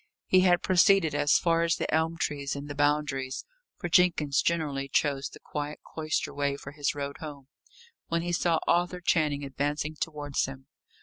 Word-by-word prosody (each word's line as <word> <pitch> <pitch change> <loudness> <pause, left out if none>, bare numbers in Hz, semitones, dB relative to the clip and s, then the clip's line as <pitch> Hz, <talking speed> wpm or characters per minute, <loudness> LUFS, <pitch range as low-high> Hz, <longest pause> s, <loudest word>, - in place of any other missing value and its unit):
He 185 - +4
had 180 -2 +4
proceeded 185 -3 +4
as 145 +1 +4
far 165 -1 +2
as 170 0 +2
the - - -3
elm 160 +1 +1
trees 140 -3 -2
in 140 0 -6
the 145 - -6
Boundaries 145 -2 0 0.3
for - - -4
Jenkins 170 -5 +3
generally 150 -5 -1
chose 140 -1 0
the - - -13
quiet 150 0 -5
cloister 160 0 -3
way 140 -1 -1
for 140 - -9
his 145 0 -2
road 140 0 -4
home 145 -3 -9 0.6
when 170 0 -1
he 175 - -2
saw 170 -1 +2
Arthur 175 +1 +2
Channing 150 -4 +1
advancing 145 +3 -2
towards 150 -3 -2
him. 135 0 -9
150 Hz, 175 wpm, -28 LUFS, 140-165 Hz, 0.6 s, He